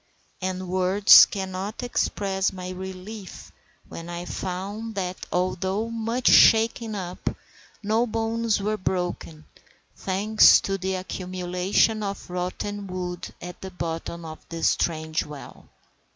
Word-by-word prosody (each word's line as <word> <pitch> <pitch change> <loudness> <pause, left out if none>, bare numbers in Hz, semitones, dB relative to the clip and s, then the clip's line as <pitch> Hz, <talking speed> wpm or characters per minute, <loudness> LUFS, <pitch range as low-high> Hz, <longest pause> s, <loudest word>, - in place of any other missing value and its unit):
And 185 0 -3
words 185 +3 +7
cannot 195 +3 -5
express 195 -5 0
my 185 -1 -6
relief 190 +2 -8 0.4
when 165 +1 -8
I 175 0 -5
found 195 +5 -5
that, 185 -2 -4
although 190 +4 -1
much 230 +2 -2
shaken 225 0 +5
up, 180 -2 -4 0.5
no 220 +4 +1
bones 225 0 0
were 210 +2 -1
broken, 175 -4 -3 0.5
thanks 205 +3 +5
to 195 0 -2
the 190 +1 -2
accumulation 185 +3 0
of 200 -2 -5
rotten 195 +3 -4
wood 180 -1 -5
at 180 +1 -9
the 190 - -6
bottom 170 -1 -5
of 155 0 -8
this 165 -1 +1
strange 160 -1 -1
well. 150 -2 -11
190 Hz, 120 wpm, -25 LUFS, 180-210 Hz, 0.5 s, words